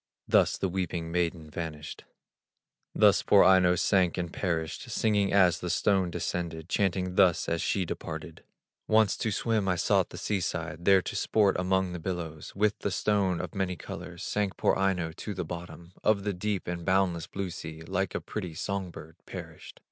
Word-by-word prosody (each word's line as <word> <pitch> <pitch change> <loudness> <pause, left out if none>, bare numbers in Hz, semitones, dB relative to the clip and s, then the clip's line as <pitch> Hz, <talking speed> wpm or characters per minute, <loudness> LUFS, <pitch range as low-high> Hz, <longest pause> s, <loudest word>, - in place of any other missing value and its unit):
Thus - - +3
the 95 - 0
weeping 85 -3 -3
maiden 85 -2 -1
vanished, 75 -1 -6 0.9
Thus - - +5
poor - - +6
Aino 90 -2 +5
sank 90 -1 +2
and 85 -2 -3
perished, 80 -4 -2
Singing 105 -3 +1
as 90 -4 +4
the 90 - -4
stone 95 0 +2
descended, 85 -1 -4
Chanting 95 -2 0
thus 90 -3 +3
as 85 0 0
she 95 -2 0
departed: 80 -1 -7 0.4
"Once 110 -2 +4
to 110 - -1
swim 110 0 0
I 90 - +2
sought - - +2
the - - -9
sea 105 -2 -1
side, 85 -1 -4
There 95 -2 +6
to - - -5
sport 105 -3 +2
among 95 0 +1
the 90 - -5
billows; 80 -3 -5
With 105 +1 +1
the - - -1
stone 95 -2 +1
of - - -5
many 95 -2 -1
colors 85 +1 -8
Sank 105 -2 -1
poor - - +2
Aino 95 -4 0
to 105 - -5
the 90 -2 -3
bottom 85 +1 -8
Of 105 -2 +3
the 105 0 -1
deep 100 +1 -3
and 85 -1 -4
boundless 90 -2 +1
blue 95 -2 -4
sea, 80 -1 -8
Like 95 +2 -2
a - - -1
pretty 90 -7 -5
son 100 +2 -3
bird 80 -1 -11
perished. - - -9
90 Hz, 180 wpm, -29 LUFS, 85-95 Hz, 0.9 s, poor